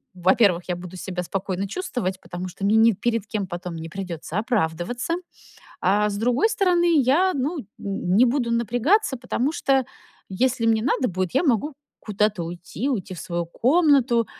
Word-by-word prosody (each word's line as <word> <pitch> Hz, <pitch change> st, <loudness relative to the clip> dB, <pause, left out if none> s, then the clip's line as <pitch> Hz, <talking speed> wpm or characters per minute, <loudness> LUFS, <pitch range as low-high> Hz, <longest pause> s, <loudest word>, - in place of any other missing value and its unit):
во-первых, 185 Hz, 0 st, +3 dB
я 180 Hz, -, 0 dB
буду 180 Hz, +1 st, -9 dB
себя 180 Hz, 0 st, -4 dB
спокойно 190 Hz, +1 st, -3 dB
чувствовать, 200 Hz, -, -3 dB
потому 180 Hz, +1 st, -6 dB
что 180 Hz, +2 st, -10 dB
мне 205 Hz, +2 st, +3 dB
ни 225 Hz, +1 st, +6 dB
перед 230 Hz, +1 st, -1 dB
кем 205 Hz, -3 st, -3 dB
потом 175 Hz, 0 st, -6 dB
не 165 Hz, 0 st, -7 dB
придётся 180 Hz, -2 st, -5 dB
оправдываться, 220 Hz, -, -1 dB, 0.7 s
а 205 Hz, +3 st, +3 dB
с 200 Hz, -, -4 dB
другой 245 Hz, -, +2 dB
стороны, 350 Hz, -7 st, +3 dB
я, 330 Hz, +10 st, +3 dB
ну, 290 Hz, +5 st, -1 dB
н 210 Hz, -, -13 dB, 0.5 s
не 240 Hz, -, +7 dB
буду 240 Hz, -1 st, 0 dB
напрягаться, 245 Hz, -, +2 dB
потому 260 Hz, +4 st, -1 dB
что 270 Hz, -5 st, +1 dB, 0.5 s
если 245 Hz, +4 st, 0 dB
мне 225 Hz, -1 st, +3 dB
надо 260 Hz, 0 st, +1 dB
будет, 185 Hz, -1 st, -3 dB
я -, -, +3 dB
могу 280 Hz, +2 st, +1 dB, 0.3 s
куда-то 210 Hz, -3 st, 0 dB
уйти, 175 Hz, +9 st, -5 dB
уйти 200 Hz, -7 st, -3 dB
в -, -, -10 dB
свою 170 Hz, 0 st, -3 dB
комнату, 260 Hz, -, +3 dB
220 Hz, 165 wpm, -23 LUFS, 185-260 Hz, 0.7 s, не